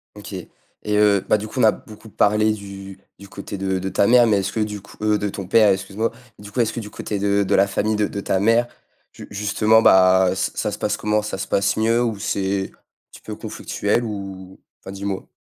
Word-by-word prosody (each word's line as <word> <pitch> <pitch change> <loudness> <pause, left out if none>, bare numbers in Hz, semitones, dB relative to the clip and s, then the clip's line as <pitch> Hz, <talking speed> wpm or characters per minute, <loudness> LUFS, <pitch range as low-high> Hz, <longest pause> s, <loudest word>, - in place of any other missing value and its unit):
OK 105 0 -10 0.5
et 105 0 0
heu, 105 -2 +4
bah, - - +4
du 105 +1 -6
coup, 130 - -6
on - - +3
a 110 - +7
beaucoup 110 +1 -13
parlé 105 +1 +2
du 100 -2 -9 0.2
du 100 0 -13
côté 100 +1 -8
de 95 -1 -1
de 95 +1 -3
ta 100 +1 +2
mère 120 0 +6
mais 110 -3 +3
est-ce 100 +1 -2
que 110 - -3
du 105 -1 -3
coup 100 - -17
heu, 105 0 +2
de 105 - -2
ton 100 0 -6
père, 110 +1 +5
excuse 95 +1 -3
moi, 115 +2 0 0.3
du 105 0 -11
coup, 115 - -4
est-ce 115 -2 +1
que - - -4
du 105 -2 -7
côté 105 -1 -5
de 100 0 +1
de 95 - +1
la 100 - +4
famille 105 +2 -1
de 105 -1 +1
de 100 - -6
ta 95 -1 0
mère, 115 +4 +3 0.5
ju - - -11
justement, 105 +2 +2
bah, 95 0 +5
ç - - -2
ça - - -2
se - - -7
passe - - -1
comment, 105 0 0
ça 105 -1 -5
se 95 - -5
passe 100 0 +1
mieux 115 +2 +2
ou 115 -3 -2
c'est 95 -1 -2
un - - -27 0.3
petit - - -14
peux - - -7
conflictuel 105 +4 -2
ou 95 -3 -7 0.2
Enfin, 95 - -9
dis-moi. 100 0 -5
100 Hz, 245 wpm, -21 LUFS, 95-110 Hz, 0.5 s, a